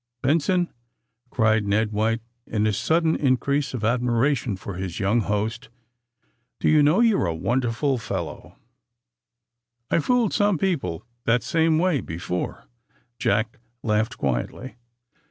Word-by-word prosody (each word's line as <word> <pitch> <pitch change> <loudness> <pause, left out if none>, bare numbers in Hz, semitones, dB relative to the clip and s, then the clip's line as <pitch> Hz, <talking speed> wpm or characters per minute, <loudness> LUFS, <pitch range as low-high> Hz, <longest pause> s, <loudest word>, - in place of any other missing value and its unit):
"Benson," 170 +5 +2 0.6
cried 110 -3 +2
Ned 105 +2 +1
White, 110 +2 0 0.2
in 105 -1 0
a 110 - +2
sudden 160 - +2
in 130 -3 +2
crease 140 0 -1
of 115 - -5
admiration 120 0 +1
for 95 +2 -7
his 90 0 -5
young 100 +4 +2
host, 110 +4 -2 0.9
"do - - 0
you 155 -1 +5
know, 150 +9 +4
you're 225 - +3
a 85 - -1
wonderful 125 - 0
fellow 95 -7 -6 1.3
1" - - -30
"I've - - -4
fooled 245 -4 +2
some 205 -4 +2
people 150 - -1 0.2
that 115 0 +2
same 160 +3 +2
way 170 -4 +2
bo 85 - -6
fore," 90 +1 -4 0.5
Jack 110 +5 0 0.2
laughed 110 +1 0
quietly. 70 - -3
120 Hz, 135 wpm, -24 LUFS, 105-150 Hz, 1.3 s, you